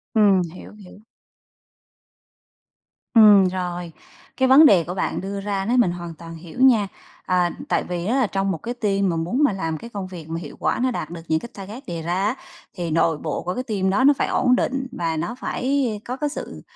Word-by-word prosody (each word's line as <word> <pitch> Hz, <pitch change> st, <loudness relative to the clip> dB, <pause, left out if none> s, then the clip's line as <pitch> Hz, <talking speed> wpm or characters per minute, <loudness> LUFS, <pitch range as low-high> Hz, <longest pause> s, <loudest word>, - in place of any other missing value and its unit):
Ừm, 200 Hz, -3 st, +5 dB
hiểu, 185 Hz, -, -11 dB
hiểu. 200 Hz, -1 st, -14 dB, 2.1 s
Ừm, 210 Hz, -4 st, +7 dB
rồi. 180 Hz, -2 st, -4 dB, 0.5 s
Cái 260 Hz, -, +3 dB
vấn 275 Hz, +4 st, +8 dB
đề 185 Hz, -, +6 dB
của 175 Hz, +3 st, -5 dB
bạn 185 Hz, -, -2 dB
đưa 195 Hz, +1 st, -5 dB
ra 195 Hz, -1 st, -2 dB
đó, 240 Hz, -, +1 dB
mình 235 Hz, -8 st, +4 dB
hoàn 175 Hz, -1 st, -6 dB
toàn 165 Hz, +1 st, -10 dB
hiểu 170 Hz, +8 st, -11 dB
nha. 230 Hz, -6 st, +5 dB, 0.4 s
À, 180 Hz, -1 st, +2 dB, 0.2 s
tại -, -, +1 dB
vì 175 Hz, -1 st, -4 dB
á 235 Hz, +6 st, +1 dB
là 260 Hz, -4 st, +2 dB
trong 195 Hz, 0 st, -1 dB
một 165 Hz, -, -2 dB
cái 240 Hz, +9 st, -5 dB
team 200 Hz, -5 st, 0 dB
mà 165 Hz, -, -1 dB
muốn 180 Hz, -, 0 dB
mà 280 Hz, -, +4 dB
làm 165 Hz, -4 st, -3 dB
cái 230 Hz, -, -10 dB
công 200 Hz, -4 st, -5 dB
việc 165 Hz, -4 st, -10 dB
mà 165 Hz, -, -3 dB
hiệu -, -, -9 dB
quả -, -, 0 dB
nó 260 Hz, -, +2 dB
đạt 235 Hz, -, -4 dB
được 170 Hz, -1 st, -8 dB
những 160 Hz, 0 st, +1 dB
cái 235 Hz, -, -9 dB
target 210 Hz, +7 st, -9 dB
đề 170 Hz, -2 st, -4 dB
ra 170 Hz, +2 st, -2 dB
á, 220 Hz, +5 st, 0 dB, 0.4 s
thì 175 Hz, -3 st, -4 dB
nội 160 Hz, -1 st, +2 dB
bộ -, -, -4 dB
của 180 Hz, -, -2 dB
cái 250 Hz, -, -3 dB
team 200 Hz, -6 st, -1 dB
đó 205 Hz, +7 st, +2 dB
nó 285 Hz, +1 st, +7 dB
phải -, -, 0 dB
ổn 250 Hz, -, +3 dB
định 265 Hz, +1 st, -1 dB
và 165 Hz, -5 st, -2 dB
nó 195 Hz, +10 st, -3 dB
phải 255 Hz, -, -3 dB, 0.4 s
có 250 Hz, +2 st, -4 dB
cái 295 Hz, +1 st, -1 dB
sự -, -, -7 dB
195 Hz, 225 wpm, -22 LUFS, 175-235 Hz, 2.1 s, vấn